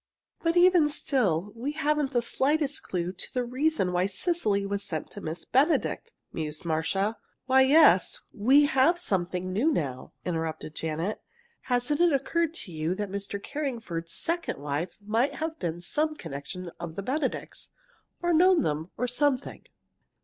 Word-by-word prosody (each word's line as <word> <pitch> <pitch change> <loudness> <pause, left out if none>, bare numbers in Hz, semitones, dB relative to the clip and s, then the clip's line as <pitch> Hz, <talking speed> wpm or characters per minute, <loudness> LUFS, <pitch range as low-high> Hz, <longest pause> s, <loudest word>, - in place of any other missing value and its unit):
"But 335 +1 +1
even 350 -4 +6
still, 210 - 0
we 260 +6 -3
haven't 300 -2 0
the 240 -3 +1
slightest 290 +4 +1
clue 180 -1 -3
to 185 - -7
the 250 - +1
reason 255 -4 0
why 180 +1 +2
Cecily 200 - 0
was 200 0 -2
sent 160 -6 -4
to 205 - -8
Miss 160 +2 -5
Benedict," 310 - +1 0.2
mused 155 0 -3
Marcia. 190 +7 0 0.3
"Why, 265 +1 +5
yes, 275 - +5
we 265 +8 +5
have 285 +4 +3
something 185 - -2
new 260 +12 +2
now," 135 - -3
interrupted 160 -3 -3
Janet. 160 +6 -3 0.4
"Hasn't 250 +5 +1
it 345 -3 +5
occurred 330 +4 0
to 205 - -6
you 160 +2 -1
that 205 -1 -4
Mr. 200 0 -4
Carringford's 230 - -4
second 335 0 -2
wife 145 +5 -3
might 230 +6 +1
have 320 0 -4
been 170 -1 -3
some 305 - -1
connection 170 - -7
of 165 -2 -6
the 200 - -4
Benedicts, 270 +4 -3 0.5
or 345 0 +2
known 360 0 +5
them, 155 +3 -2
or 250 - 0
something?" 270 +1 -1
230 Hz, 155 wpm, -28 LUFS, -, 0.5 s, even